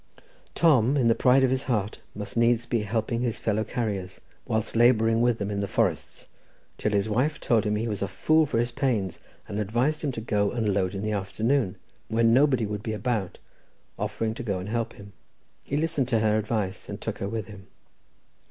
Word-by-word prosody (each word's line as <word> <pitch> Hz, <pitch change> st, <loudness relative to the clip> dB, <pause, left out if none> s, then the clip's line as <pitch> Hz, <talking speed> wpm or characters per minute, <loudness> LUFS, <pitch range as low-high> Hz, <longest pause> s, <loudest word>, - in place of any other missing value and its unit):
Tom, 140 Hz, -5 st, +4 dB
in 120 Hz, -4 st, +3 dB
the -, -, +6 dB
pride 130 Hz, +3 st, +4 dB
of 130 Hz, -, +3 dB
his 130 Hz, 0 st, +1 dB
heart, 105 Hz, -3 st, -1 dB, 0.2 s
must 105 Hz, 0 st, -6 dB
needs 115 Hz, 0 st, +3 dB
be 120 Hz, -1 st, 0 dB
helping 110 Hz, +2 st, -1 dB
his 120 Hz, -3 st, -1 dB
fellow 110 Hz, 0 st, 0 dB
carriers, 100 Hz, -7 st, -3 dB, 0.3 s
whilst 110 Hz, 0 st, -1 dB
labouring 115 Hz, -1 st, +4 dB
with 120 Hz, -1 st, +3 dB
them 100 Hz, -1 st, -3 dB
in 100 Hz, -, -2 dB
the 100 Hz, -, -2 dB
forests, -, -, -1 dB, 0.5 s
till 105 Hz, -, 0 dB
his 100 Hz, 0 st, +1 dB
wife 130 Hz, +8 st, 0 dB
told 110 Hz, -3 st, +2 dB
him 105 Hz, 0 st, +1 dB
he 110 Hz, +3 st, -1 dB
was 105 Hz, -3 st, -3 dB
a 100 Hz, -, 0 dB
fool 155 Hz, +7 st, +2 dB
for 115 Hz, -, -1 dB
his 120 Hz, +1 st, +1 dB
pains, 115 Hz, -, -1 dB, 0.3 s
and 100 Hz, -, -4 dB
advised 120 Hz, +9 st, 0 dB
him 145 Hz, -, 0 dB
to 120 Hz, -, -5 dB
go 105 Hz, -3 st, 0 dB
and 110 Hz, -3 st, 0 dB
load 95 Hz, 0 st, 0 dB
in 95 Hz, -, -4 dB
the 110 Hz, -, -1 dB
afternoon, 105 Hz, +2 st, 0 dB, 0.3 s
when 115 Hz, +1 st, +3 dB
nobody 130 Hz, -3 st, +4 dB
would 105 Hz, 0 st, -4 dB
be 110 Hz, -, -3 dB
about, 105 Hz, -3 st, -2 dB, 0.6 s
offering 110 Hz, -1 st, -2 dB
to 115 Hz, -, -7 dB
go 100 Hz, -6 st, -2 dB
and 90 Hz, +3 st, -6 dB
help 115 Hz, 0 st, -2 dB
him. 100 Hz, -1 st, -13 dB, 0.5 s
He 140 Hz, -, -2 dB
listened 155 Hz, -4 st, 0 dB
to 115 Hz, -3 st, +2 dB
her 110 Hz, -1 st, +3 dB
advice, 105 Hz, -3 st, -3 dB
and -, -, -5 dB
took -, -, -5 dB
her 100 Hz, -, -3 dB
with 110 Hz, -2 st, -3 dB
him. 100 Hz, -3 st, -12 dB
110 Hz, 210 wpm, -26 LUFS, 105-120 Hz, 0.6 s, the